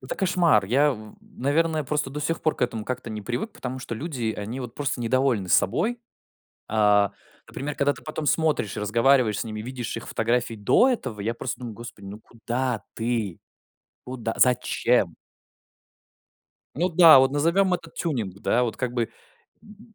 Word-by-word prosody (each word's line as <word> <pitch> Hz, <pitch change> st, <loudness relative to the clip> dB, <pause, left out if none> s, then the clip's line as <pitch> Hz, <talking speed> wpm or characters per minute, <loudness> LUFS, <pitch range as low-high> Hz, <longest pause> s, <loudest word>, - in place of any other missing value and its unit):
Это 130 Hz, -, -5 dB
кошмар. 175 Hz, -, +3 dB
Я, 140 Hz, +8 st, +3 dB
в 110 Hz, -3 st, -10 dB
наверное, 155 Hz, +3 st, -1 dB
просто 150 Hz, 0 st, -1 dB
до 150 Hz, +2 st, -5 dB
сих 160 Hz, +2 st, -1 dB
пор 155 Hz, -, 0 dB
к -, -, -4 dB
этому 115 Hz, -3 st, -1 dB
как-то 125 Hz, -2 st, -5 dB
не 110 Hz, -1 st, -5 dB
привык, 125 Hz, -, -3 dB
потому 130 Hz, 0 st, -6 dB
что 125 Hz, -3 st, -6 dB
люди, 125 Hz, -4 st, -3 dB
они 110 Hz, +6 st, -5 dB
вот 120 Hz, -2 st, -7 dB
просто 140 Hz, -3 st, -2 dB
недовольны 120 Hz, -4 st, +1 dB
собой. 190 Hz, -, +2 dB, 0.7 s
А, 105 Hz, -2 st, +3 dB, 0.4 s
например, 145 Hz, +1 st, -5 dB
когда 145 Hz, 0 st, +2 dB
ты -, -, -14 dB
потом 155 Hz, 0 st, -5 dB
смотришь, 150 Hz, -10 st, +1 dB
разговариваешь 115 Hz, +2 st, +3 dB
с -, -, -1 dB
ними, 110 Hz, -2 st, -6 dB
видишь 125 Hz, 0 st, -5 dB
их 115 Hz, -, -8 dB
фотографии 120 Hz, +1 st, 0 dB
до 110 Hz, -, +4 dB
этого, 170 Hz, -, -3 dB
я 110 Hz, +3 st, -1 dB
просто -, -, -5 dB
думаю: 120 Hz, -3 st, -6 dB
"Господи, 115 Hz, -3 st, -10 dB
ну 100 Hz, +2 st, -8 dB
куда 120 Hz, +1 st, -3 dB
ты? 110 Hz, -6 st, -2 dB, 0.7 s
Куда? 120 Hz, -3 st, -4 dB
Зачем?" 125 Hz, -1 st, +2 dB, 1.6 s
Ну 180 Hz, -, +1 dB
да, 165 Hz, -4 st, +8 dB
вот 130 Hz, 0 st, +4 dB
назовём 170 Hz, +6 st, +2 dB
это 165 Hz, -2 st, -6 dB
тюнинг, 115 Hz, -, -3 dB
да, 120 Hz, +3 st, +2 dB
вот 115 Hz, -3 st, -2 dB
как 125 Hz, -1 st, -2 dB
бы. 120 Hz, -2 st, -1 dB, 0.5 s
Н 220 Hz, +2 st, -17 dB
125 Hz, 170 wpm, -25 LUFS, 110-150 Hz, 1.6 s, да